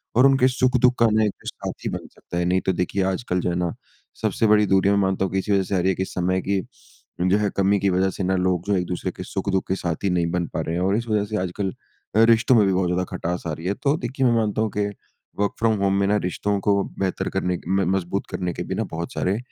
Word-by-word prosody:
और 125 - +6
उनके 135 -2 +5
सुख-दुख 125 -1 +3
का 115 - +6
ना 110 0 +3
एक 105 - -5
साथी - - -5
बन - - -5
सकता 85 - -8
है। 90 - +1
नहीं, 90 +1 +2
तो 95 - 0
देखिए 90 +2 -1
आजकल 90 -3 -2
जो - - -1
है 85 - -1
ना, 90 -1 -1 0.5
सबसे 110 - +1
बड़ी 105 0 +5
दूरी 95 0 +3
में 100 - +3
मानता 95 -1 +1
हूँ 95 - -4
कि 95 - +2
इसी 100 - -3
वज़ह 100 -1 +3
से 95 - -2
आ - - +2
रही 90 +2 +2
है 95 - +1
कि 95 - -1
समय 95 0 -1
की, 100 0 0 0.6
जो 95 +3 +3
है 105 -1 +1
कमी 100 +1 +3
की 100 - +1
वज़ह 95 +1 +2
से 95 - -4
ना 95 +1 +1
लोग 90 -1 0
जो 100 - +2
एक-दूसरे 90 +1 -2
के 90 - -5
सुख-दुख 95 0 -2
के 95 - 0
साथी 90 +2 -2
नहीं 85 -2 +1
बन 90 -1 -1
पा - - -1
रहे 80 - -3
हैं। 90 - -1
और 95 +2 +2
इस 120 +1 -3
वज़ह 105 -2 +1
से 105 +1 -3
आजकल 95 +1 -3 0.4
अ, 110 - +6
रिश्तों 115 +2 +4
में 105 -3 +5
भी 95 - +2
बहुत 90 -1 +1
ज़्यादा 90 +1 0
खटास 90 -1 -3
आ - - -2
रही 80 +3 -8
है, 100 - +1
तो 140 +7 0
देखिए 130 0 -2
मैं 120 - +4
मानता 110 -1 0
हूँ 110 - +1
कि 105 - +2 0.5
वर्क 100 -1 +1
फ्रॉम 115 -1 +3
होम 95 0 +2
में 100 - +2
ना 105 +1 +3
रिश्तों 100 +2 -1
को 100 0 +2 0.2
बेहतर 95 -1 -1
करने 90 -2 0
के 85 - -7
म 95 0 +2
मज़बूत 95 +1 -2
करने 90 -1 -2
के - - -4
भी - - -4
ना - - -1
बहुत 85 +1 -5
सारे 95 +3 0
95 Hz, 280 wpm, -23 LUFS, 90-105 Hz, 0.6 s, और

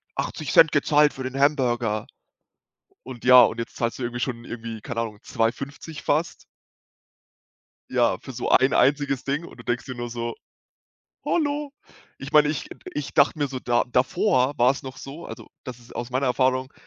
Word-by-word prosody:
80 150 -5 -3
Cent 160 - +7
gezahlt 150 0 +3
für 130 - -8
den 130 +1 -4
Hamburger“, 120 -7 +1 1.0
und 125 -3 -10
ja 125 0 +9
und 110 - -1
jetzt 115 - -7
zahlst 115 +1 -2
du - - -5
irgendwie 120 0 -3
schon 120 -2 -3
irgendwie, 115 -2 -7
keine 115 +2 -4
Ahnung, 105 -3 -6
2,50 140 +6 -3
fast. 155 +4 -1 1.5
Ja, - - +2
für - - -9
so - - -3
ein 130 +1 +5
einziges 140 -1 +2
Ding 145 +5 -2
und - - -13
du - - -10
denkst 120 0 -2
dir 130 - -6
nur 120 0 -5
so: 115 -1 -4 0.9
„Hallo?“ 290 -3 -1 0.5
Ich 135 - -8
meine, 150 -1 +5
ich 150 - -3 0.3
ich 145 -1 -4
dachte 140 +2 +4
mir 145 -2 -1
so 130 - -5
da 120 -1 +1
davor 130 +1 +2
war's 130 +3 +2
noch 130 0 -8
so, 145 +6 -9
also - - -10 0.2
das 125 -3 -8
ist 120 - -16
aus 120 +1 -5
meiner 130 +2 0
Erfahrung, 130 +1 +1
130 Hz, 180 wpm, -24 LUFS, 120-145 Hz, 1.5 s, ja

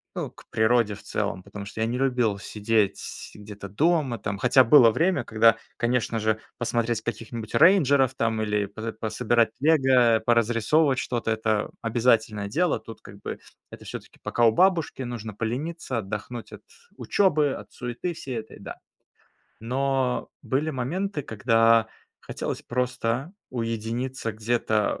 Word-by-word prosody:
ну, - - -4
к - - -18
природе 110 -1 +2
в - - -15
целом, 90 - -3
потому 100 +1 -8
что 100 - -9
я - - +2
не 120 +2 -2
любил 125 -6 +1
сидеть 105 0 -2
где-то 105 -1 -9
дома 145 - +1
там, 105 -2 -4
хотя 125 +3 +5
было 125 -1 +7
время, 180 +9 +1
когда, 115 0 +4 0.2
конечно 120 -1 0
же, 110 0 0 0.2
посмотреть 120 -1 -1
каких-нибудь 115 0 -6
рейнджеров 140 -7 +5
там 115 -3 0
или 105 -1 0
по 110 +3 -6
пособирать 115 +1 +1
лего, 130 -6 +4
поразрисовывать 120 +5 +3
что-то- 120 -3 -2
это 110 -1 0
обязательное 115 -3 +1
дело. 155 - +1
Тут 110 0 -12
как 100 0 -13
бы - - -6 0.3
это - - -12
всё-таки - - -9
пока 120 - +1
у 115 - +6
бабушки, 170 - +2
нужно 115 -3 -6
полениться, 125 - -3
отдохнуть 110 +3 -6
от - - -11 0.3
учёбы, 155 -7 +2
от - - -9
суеты 125 +8 -4
всей 130 -6 -6
этой, 110 0 -8
да. - - -8 0.8
Но 130 +1 -1
были 145 +4 -1
моменты, 155 +6 -3
когда 115 0 +3 0.3
хотелось - - -5
просто 125 +4 -2 0.2
уединиться 115 +1 -3
где-то 110 -1 0
115 Hz, 140 wpm, -25 LUFS, 110-130 Hz, 0.8 s, было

